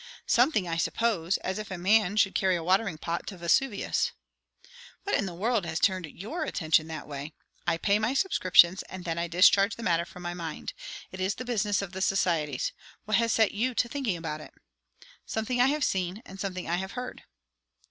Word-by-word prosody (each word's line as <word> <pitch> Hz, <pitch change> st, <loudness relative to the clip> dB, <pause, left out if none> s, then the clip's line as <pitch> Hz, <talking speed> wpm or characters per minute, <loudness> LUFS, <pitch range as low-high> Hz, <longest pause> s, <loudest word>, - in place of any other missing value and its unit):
"Something, 245 Hz, -, +3 dB
I 165 Hz, -1 st, -2 dB
suppose. 195 Hz, -2 st, 0 dB
As 190 Hz, +3 st, -2 dB
if 215 Hz, -, -6 dB
a 190 Hz, -, -4 dB
man 205 Hz, +2 st, +3 dB
should 195 Hz, -2 st, +3 dB
carry 190 Hz, -1 st, +2 dB
a 170 Hz, -, -3 dB
watering 190 Hz, 0 st, +1 dB
pot 170 Hz, +2 st, -4 dB
to 195 Hz, -, -6 dB
Vesuvius." 200 Hz, +6 st, +1 dB, 0.9 s
"What 405 Hz, -, 0 dB
in 200 Hz, -, 0 dB
the 175 Hz, -, -6 dB
world 220 Hz, +3 st, 0 dB
has 160 Hz, 0 st, -2 dB
turned 185 Hz, -5 st, +1 dB
your 220 Hz, -, -5 dB
attention 160 Hz, -, +1 dB
that 160 Hz, -1 st, -7 dB
way? 145 Hz, +1 st, -6 dB, 0.3 s
I 165 Hz, -1 st, +2 dB
pay 200 Hz, +5 st, +2 dB
my 225 Hz, +5 st, 0 dB
subscriptions, 185 Hz, -, +5 dB
and 185 Hz, -2 st, -8 dB
then 165 Hz, -1 st, -2 dB
I 170 Hz, -, -1 dB
discharge 195 Hz, +4 st, +5 dB
the 230 Hz, -, -8 dB
matter 170 Hz, -3 st, +2 dB
from 180 Hz, +1 st, -12 dB
my 175 Hz, 0 st, -3 dB
mind. 170 Hz, -, -6 dB, 0.4 s
It 185 Hz, -, -9 dB
is 190 Hz, +2 st, 0 dB
the 255 Hz, -, -6 dB
business 210 Hz, -4 st, 0 dB
of 190 Hz, -, -6 dB
the 190 Hz, -, -5 dB
societies. 165 Hz, -8 st, +1 dB, 0.3 s
What 215 Hz, -, +2 dB
has 230 Hz, 0 st, +2 dB
set 220 Hz, -2 st, +3 dB
you 245 Hz, +4 st, -1 dB
to 240 Hz, -, +2 dB
thinking 240 Hz, -8 st, -2 dB
about 155 Hz, -2 st, -5 dB
it?" -, -, -13 dB, 0.7 s
"Something 240 Hz, +3 st, -1 dB
I 250 Hz, -, +6 dB
have 295 Hz, +1 st, 0 dB
seen, 190 Hz, +2 st, -1 dB
and 195 Hz, -, -11 dB
something 185 Hz, -2 st, -4 dB
I 170 Hz, +1 st, 0 dB
have 190 Hz, +1 st, -5 dB
heard." 250 Hz, +1 st, -6 dB
190 Hz, 205 wpm, -28 LUFS, 170-220 Hz, 0.9 s, I